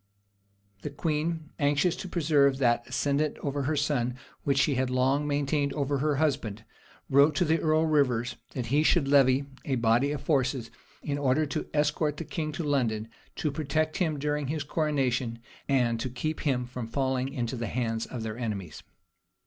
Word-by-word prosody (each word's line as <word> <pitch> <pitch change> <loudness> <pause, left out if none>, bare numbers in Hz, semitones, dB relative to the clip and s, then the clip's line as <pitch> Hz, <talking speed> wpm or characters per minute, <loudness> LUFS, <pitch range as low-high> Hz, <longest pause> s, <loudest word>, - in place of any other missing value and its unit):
The - - -4
queen, 160 0 -2
anxious 145 +4 +2
to 185 - -6
preserve 145 -5 +3
that 120 -2 +2
ascendant 145 +1 0
over 140 0 -2
her 150 +3 0
son 140 -5 0 0.3
which 140 -1 +1
she 140 +1 +3
had 130 0 0
long 135 +3 +1
maintained 145 0 0
over 140 -1 -1
her 150 +1 +1
husband, 130 -8 -1 0.4
wrote 140 +2 +5
to 175 - +2
the 160 +1 +2
earl 155 0 +2
of 160 - 0
Rivers, 125 -5 +2 0.2
that 125 -3 -2
he 140 +6 +2
should 155 -2 +3
levy 135 -1 +4 0.2
a 135 - -1
body 120 +4 +2
of 145 -2 -3
forces, 135 -5 0 0.3
in 145 -1 -2
order 140 +2 +2
to 145 - -4
escort 150 0 +1
the 165 - -5
king 155 0 -3
to 165 - -3
London, 115 -7 0 0.3
to 150 - -1
protect 155 +2 -1
him 160 -5 0
during 150 0 -1
his 150 +1 -2
coronation, 135 -6 0 0.3
and 120 -4 +2
to 130 - -2
keep 155 +6 -3
him 130 -5 0
from 125 -1 -6
falling 130 +1 -1
into 125 -3 -3
the 115 -2 -3
hands 115 -1 -2
of 120 -3 -5
their 110 +1 -5
enemies. 100 -9 -4
140 Hz, 180 wpm, -28 LUFS, 125-150 Hz, 0.4 s, wrote